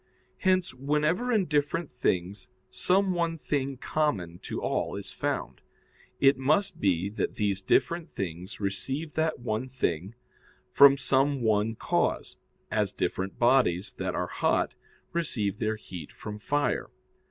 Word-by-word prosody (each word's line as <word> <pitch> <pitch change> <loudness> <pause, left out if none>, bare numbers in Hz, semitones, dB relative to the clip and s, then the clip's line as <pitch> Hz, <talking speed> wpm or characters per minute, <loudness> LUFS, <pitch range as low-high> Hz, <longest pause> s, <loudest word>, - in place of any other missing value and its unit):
Hence 185 -4 +2
whenever 150 - 0
in 215 -5 +3
different 150 +2 0
things 95 -5 -1 0.2
some 190 +1 +2
one 170 -1 0
thing 140 -3 -2
common 100 - -1
to - - -5
all - - -1
is - - -6
found, - - -3 0.6
it 135 -1 +5
must 155 +9 +1
be 95 -2 +2
that 105 - -2
these 100 -3 0
different 170 - +1
things 90 -1 -5
receive 135 +10 -3
that 160 0 0
one 120 0 -3
thing 95 -5 -2 0.6
from 140 0 +8
some 135 0 +1
one 110 0 +2
cause, - - 0 0.3
as - - +1
different 95 +1 -2
bodies 120 -7 +3
that - - -2
are - - 0
hot - - 0 0.4
receive 110 - -1
their 110 0 0
heat 90 -7 -9
from 105 -1 -8
fire. 145 +3 0
130 Hz, 135 wpm, -28 LUFS, 100-155 Hz, 0.6 s, from